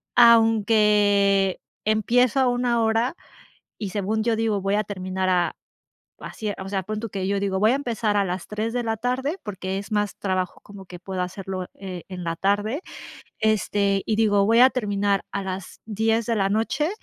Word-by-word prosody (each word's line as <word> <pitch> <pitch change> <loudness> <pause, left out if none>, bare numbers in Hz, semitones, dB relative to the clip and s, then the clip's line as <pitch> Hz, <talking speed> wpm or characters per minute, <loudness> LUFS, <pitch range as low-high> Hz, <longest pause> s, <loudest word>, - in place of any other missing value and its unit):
aunque 210 -4 +4 0.2
empiezo 235 +4 +2
a 255 - +3
una 245 -1 +1
hora 225 +7 +1 0.6
y 205 -3 -4
según 210 +3 -1
yo 230 -1 +1
digo, 220 -3 0
voy 195 +1 0
a 210 - +1
terminar 185 -1 -3
a 175 -1 +2 0.7
así, 215 -1 -5
o 190 0 -6
sea, 195 -2 -1
pon 215 +3 -4
tú 230 -1 -5
que 190 -1 -3
yo 200 0 0
digo: 195 -1 -1
"Voy 215 +3 +4
a - - +2
empezar 230 -6 -1
a 200 - +3
las 180 0 -4
3 215 +2 -3
de 245 - 0
la 225 0 -1
tarde", 255 - -2
porque 190 -2 -4
es 205 +2 -8
más 205 -2 0
trabajo 185 -2 -2
como 200 -2 -12
que 180 -1 -10
puedo 185 0 -5
hacerlo, 185 0 -5
e 185 -3 -8
en 180 -2 -7
la 165 0 -2
tarde, 205 - 0 0.6
este, 205 -2 +1
y 215 - 0
digo: 205 -3 +3
"Voy 230 +2 +4
a 255 - +8
terminar 205 -5 0
a 200 - -2
las 190 0 -6
10 225 +1 0
de 230 - +1
la 195 -2 +1
noche. 225 - 0
205 Hz, 190 wpm, -24 LUFS, 195-225 Hz, 0.7 s, a